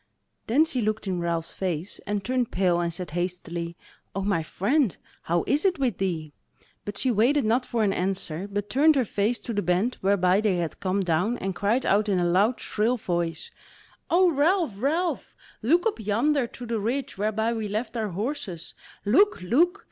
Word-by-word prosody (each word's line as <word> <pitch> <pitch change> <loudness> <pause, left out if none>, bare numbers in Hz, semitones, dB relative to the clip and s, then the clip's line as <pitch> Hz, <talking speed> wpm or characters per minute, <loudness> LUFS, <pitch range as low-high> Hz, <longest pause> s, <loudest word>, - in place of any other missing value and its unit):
Then 280 +8 +4
she 260 -6 -2
looked 215 0 -1
in 185 -2 -1
Ralph's 170 -1 -1
face, 180 0 -3
and 205 -1 -1
turned 250 -1 0
pale 180 -2 +2
and 170 -1 0
said 180 0 -4
hastily: 170 -1 -4 0.4
"O 195 - -1
my 195 -4 +1
friend 210 - 0 0.2
how 170 +1 0
is 290 +2 +1
it 375 -3 +2
with 255 -8 -1
thee?" 165 -6 -2 0.5
But 205 - -5
she 260 - +1
waited 240 +5 +3
not 240 +4 +1
for 230 -2 0
an 200 -2 +2
answer, 185 -1 -1
but 205 0 -2
turned 300 +7 +4
her 260 -3 +2
face 210 +4 0
to 235 - -4
the 205 - 0
bent 185 +8 0
whereby 190 0 +3
they 210 -4 +2
had 170 -2 -3
come 195 +1 0
down, 180 +7 +1
and 195 0 -3
cried 215 +7 0
out 210 +2 +2
in 195 - +2
a 175 - +1
loud, 200 +8 +2
shrill 225 +4 0
voice: 170 -5 -3 0.6
"O 355 +1 +4
Ralph, 320 - +2
Ralph! 330 +6 -1 0.3
look 325 +10 +3
up 450 - 0
yonder 240 +6 +1
to 245 - -9
the 230 -1 -2
ridge 245 +2 -3
whereby 220 +2 0
we 220 -2 -3
left 220 +3 -3
our 220 -2 -1
horses; 195 - -4 0.3
look, 290 - +3
look! 340 - +2
210 Hz, 190 wpm, -26 LUFS, 180-250 Hz, 0.6 s, Then